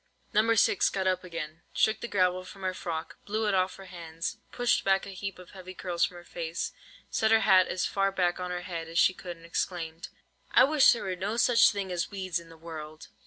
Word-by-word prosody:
No. 225 Hz, +2 st, +4 dB
6 205 Hz, -, +4 dB
got 190 Hz, -1 st, -2 dB
up 185 Hz, 0 st, +1 dB
again, 165 Hz, -2 st, -6 dB
shook 220 Hz, 0 st, +2 dB
the -, -, -3 dB
gravel 185 Hz, -3 st, +1 dB
from 190 Hz, +1 st, -12 dB
her 185 Hz, 0 st, 0 dB
frock, 165 Hz, -3 st, -5 dB
blew 215 Hz, +1 st, 0 dB
it 205 Hz, -, +1 dB
off 185 Hz, 0 st, +1 dB
her 195 Hz, -, -11 dB
hands, 165 Hz, -2 st, -6 dB
pushed 245 Hz, -1 st, +1 dB
back 195 Hz, 0 st, +2 dB
a -, -, -8 dB
heap 195 Hz, 0 st, -6 dB
of 180 Hz, -1 st, -13 dB
heavy 185 Hz, -1 st, -10 dB
curls 175 Hz, -2 st, 0 dB
from 180 Hz, -, -8 dB
her 175 Hz, -, -11 dB
face, 165 Hz, -1 st, -4 dB, 0.4 s
set 220 Hz, -, +2 dB
her 225 Hz, 0 st, +5 dB
hat 190 Hz, -3 st, +5 dB
as 180 Hz, +1 st, -1 dB
far 195 Hz, 0 st, +1 dB
back 180 Hz, -2 st, 0 dB
on 180 Hz, 0 st, -3 dB
her 180 Hz, 0 st, -3 dB
head 165 Hz, -3 st, -5 dB
as 165 Hz, +1 st, -6 dB
she 185 Hz, -, +5 dB
could, 175 Hz, -2 st, -8 dB
and 165 Hz, -, -15 dB
exclaimed:— 165 Hz, -1 st, -3 dB, 0.4 s
"I -, -, +8 dB
wish 285 Hz, 0 st, +6 dB
there 235 Hz, -, -1 dB
were 185 Hz, -1 st, -2 dB
no 200 Hz, +5 st, -3 dB
such 235 Hz, 0 st, +6 dB
things 195 Hz, -2 st, -3 dB
as 175 Hz, -1 st, -1 dB
weeds 185 Hz, -3 st, -3 dB
in 165 Hz, -1 st, -14 dB
the 165 Hz, -, -14 dB
world!" 155 Hz, -1 st, -9 dB
185 Hz, 235 wpm, -29 LUFS, 170-195 Hz, 0.4 s, I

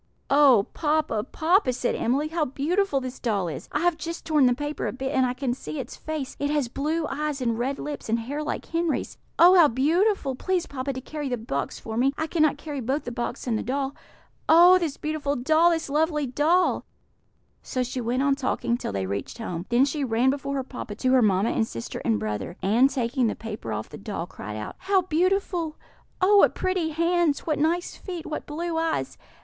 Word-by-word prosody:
"Oh, 275 Hz, -8 st, +6 dB
papa, 300 Hz, -8 st, 0 dB
papa!" 330 Hz, +2 st, +2 dB
said 250 Hz, 0 st, -1 dB
Emily, 280 Hz, +6 st, 0 dB
"how 325 Hz, 0 st, 0 dB
beautiful 295 Hz, +4 st, 0 dB
this 255 Hz, 0 st, -6 dB
doll 205 Hz, -7 st, 0 dB
is! 155 Hz, -5 st, -6 dB
I 295 Hz, -, -1 dB
have 345 Hz, -2 st, +1 dB
just 335 Hz, +2 st, -5 dB
torn 300 Hz, -5 st, +4 dB
the 245 Hz, -, +3 dB
paper 290 Hz, +2 st, -3 dB
a -, -, -1 dB
bit, 265 Hz, +1 st, -4 dB
and 260 Hz, -1 st, +3 dB
I 250 Hz, -, -3 dB
can 255 Hz, -2 st, -1 dB
see 155 Hz, -, -7 dB
its -, -, -6 dB
face; 310 Hz, -4 st, -5 dB
it 285 Hz, -, 0 dB
has 295 Hz, -4 st, +1 dB
blue 310 Hz, +5 st, -1 dB
eyes 295 Hz, 0 st, -2 dB
and 235 Hz, -3 st, 0 dB
red 270 Hz, +3 st, -1 dB
lips, 295 Hz, -6 st, -6 dB
and 225 Hz, -, +2 dB
hair 270 Hz, +6 st, -4 dB
like 300 Hz, -, -3 dB
Henry's. 335 Hz, -2 st, -2 dB, 0.2 s
Oh, 350 Hz, +2 st, +8 dB
how 340 Hz, -4 st, +8 dB
beautiful! 300 Hz, -, +1 dB
Please, 360 Hz, +6 st, -1 dB
papa, 275 Hz, 0 st, -4 dB
to 260 Hz, -, -6 dB
carry 295 Hz, +1 st, -5 dB
the 245 Hz, -, -1 dB
box 180 Hz, -, -3 dB
for 220 Hz, 0 st, -6 dB
me; 270 Hz, +3 st, +2 dB
I 315 Hz, -, -1 dB
cannot 310 Hz, -3 st, +2 dB
carry 290 Hz, -1 st, -6 dB
both 265 Hz, +6 st, -1 dB
the 245 Hz, -, -5 dB
box 240 Hz, 0 st, -4 dB
and 225 Hz, -4 st, 0 dB
the -, -, -2 dB
doll. 270 Hz, +1 st, -2 dB, 0.6 s
Oh, 350 Hz, +3 st, +8 dB
this 320 Hz, -5 st, -2 dB
beautiful 300 Hz, -2 st, -2 dB
doll! 315 Hz, +7 st, +4 dB
this 330 Hz, -2 st, -1 dB
lovely 300 Hz, +1 st, +1 dB
doll!" 310 Hz, +8 st, +2 dB, 0.8 s
So 255 Hz, -, -2 dB
she 250 Hz, +1 st, -4 dB
went 245 Hz, +3 st, 0 dB
on 280 Hz, -1 st, +3 dB
talking 255 Hz, -3 st, -1 dB
till -, -, -4 dB
they 100 Hz, -1 st, -2 dB
reached 100 Hz, -, -4 dB
home; 180 Hz, -5 st, -5 dB
then 245 Hz, +3 st, +4 dB
she 285 Hz, +1 st, -2 dB
ran 245 Hz, +1 st, +2 dB
before 280 Hz, 0 st, -3 dB
her 270 Hz, -, -1 dB
papa 250 Hz, -5 st, -7 dB
to 255 Hz, +4 st, 0 dB
her 260 Hz, -1 st, +5 dB
mamma 205 Hz, 0 st, +3 dB
and 225 Hz, -2 st, 0 dB
sister 115 Hz, -, -6 dB
and 110 Hz, -2 st, +1 dB
brother, 105 Hz, -, -4 dB
and, 235 Hz, +7 st, +4 dB
taking 255 Hz, -1 st, 0 dB
the -, -, -1 dB
paper 215 Hz, -, -6 dB
off 110 Hz, 0 st, -4 dB
the 150 Hz, -, -10 dB
doll, 200 Hz, -5 st, -4 dB
cried 105 Hz, -, -8 dB
out: 105 Hz, -, -6 dB
"How 380 Hz, -1 st, +2 dB
beautiful! 350 Hz, -1 st, 0 dB, 0.4 s
Oh, 405 Hz, +2 st, +5 dB
what -, -, +5 dB
pretty 370 Hz, -3 st, 0 dB
hands! 335 Hz, -1 st, +1 dB
What 305 Hz, -3 st, -1 dB
nice 335 Hz, +4 st, 0 dB
feet! 355 Hz, -4 st, -7 dB
What 305 Hz, -, -5 dB
blue 325 Hz, +2 st, -2 dB
eyes! 325 Hz, -1 st, -2 dB
280 Hz, 215 wpm, -25 LUFS, 245-320 Hz, 0.8 s, Oh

